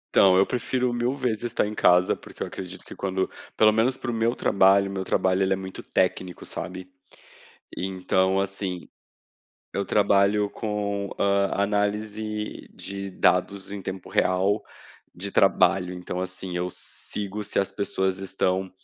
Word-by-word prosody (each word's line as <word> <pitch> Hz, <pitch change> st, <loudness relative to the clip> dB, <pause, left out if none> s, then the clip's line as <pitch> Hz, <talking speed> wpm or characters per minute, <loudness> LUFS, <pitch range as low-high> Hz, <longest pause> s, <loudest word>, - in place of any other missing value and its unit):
Então 95 Hz, -1 st, +7 dB
eu 95 Hz, -, +5 dB
prefiro 125 Hz, 0 st, -1 dB
mil 120 Hz, +3 st, 0 dB
vezes 120 Hz, -6 st, -1 dB
estar 115 Hz, -2 st, 0 dB
em 105 Hz, -, -4 dB
casa, 90 Hz, -2 st, +4 dB
porque -, -, -8 dB
eu -, -, -3 dB
acredito 95 Hz, 0 st, -8 dB
que -, -, -10 dB
quando, 95 Hz, -1 st, -1 dB, 0.3 s
pelo 110 Hz, 0 st, +6 dB
menos 125 Hz, +4 st, +2 dB
para 120 Hz, -, -3 dB
o -, -, -3 dB
meu 115 Hz, +2 st, +1 dB
trabalho, 100 Hz, 0 st, +4 dB
o 100 Hz, -, -6 dB
meu 95 Hz, -1 st, -2 dB
trabalho 95 Hz, 0 st, +1 dB
ele 95 Hz, 0 st, +3 dB
é -, -, +1 dB
muito 95 Hz, 0 st, -7 dB
técnico, 90 Hz, -2 st, -1 dB
sabe. 90 Hz, 0 st, -6 dB, 0.9 s
Então 95 Hz, 0 st, +1 dB
assim, 95 Hz, -2 st, -3 dB, 0.9 s
eu 100 Hz, -, -1 dB
trabalho 100 Hz, 0 st, +3 dB
com, 100 Hz, -2 st, -2 dB
ah, 100 Hz, 0 st, +2 dB
análise 105 Hz, +1 st, -2 dB
de 100 Hz, 0 st, -6 dB
dados 100 Hz, +1 st, +1 dB
em 100 Hz, -, -4 dB
tempo 95 Hz, 0 st, -6 dB
real, 95 Hz, +3 st, +2 dB, 0.5 s
de 100 Hz, +3 st, -4 dB
trabalho 90 Hz, -1 st, +3 dB
então, 90 Hz, 0 st, -5 dB
assim, 95 Hz, 0 st, -4 dB
eu 90 Hz, +1 st, -1 dB
sigo 105 Hz, +3 st, -5 dB
se 105 Hz, -, -2 dB
as 100 Hz, -, 0 dB
pessoas 95 Hz, -2 st, -1 dB
estão 95 Hz, -1 st, -1 dB
100 Hz, 155 wpm, -25 LUFS, 95-105 Hz, 0.9 s, Então